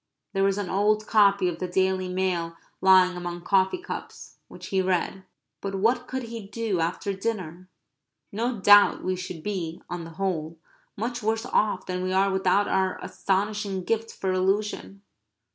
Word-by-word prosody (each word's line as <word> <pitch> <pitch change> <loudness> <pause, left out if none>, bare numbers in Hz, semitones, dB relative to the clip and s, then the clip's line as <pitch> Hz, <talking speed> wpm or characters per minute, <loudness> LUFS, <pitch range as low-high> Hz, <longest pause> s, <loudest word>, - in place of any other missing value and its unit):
There 195 -1 +1
was 195 0 +2
an 205 -2 -2
old 210 +3 +1
copy 200 -4 +4
of 170 -1 -3
the 185 - -2
Daily 185 0 0
Mail 180 -3 -1 0.2
lying 185 -1 +6
among 175 0 -5
coffee 190 - +2
cups; 385 +4 -8
which - - -10
he 190 -1 +2
read. 185 +1 -1 0.4
But 195 0 -4
what 240 +5 +1
could 260 0 -4
he 230 -3 -7
do 210 -3 -2
after 175 +4 -1
dinner? 185 -4 -4 0.6
No 230 +2 -2
doubt 205 +1 +6
we 185 0 0
should 180 -3 -7
be, 175 -5 -3
on 175 -1 -4
the 165 - -9
whole, 165 -4 -2 0.4
much 240 +3 -3
worse 225 +2 -1
off 215 -3 +1
than 180 0 -3
we 185 0 -2
are 195 +1 +3
without 190 +1 +2
our 190 -1 +1
astonishing 200 -1 -1
gift 225 +3 -1
for 190 - -2
illusion. 195 +1 -1
190 Hz, 165 wpm, -26 LUFS, 185-210 Hz, 0.6 s, lying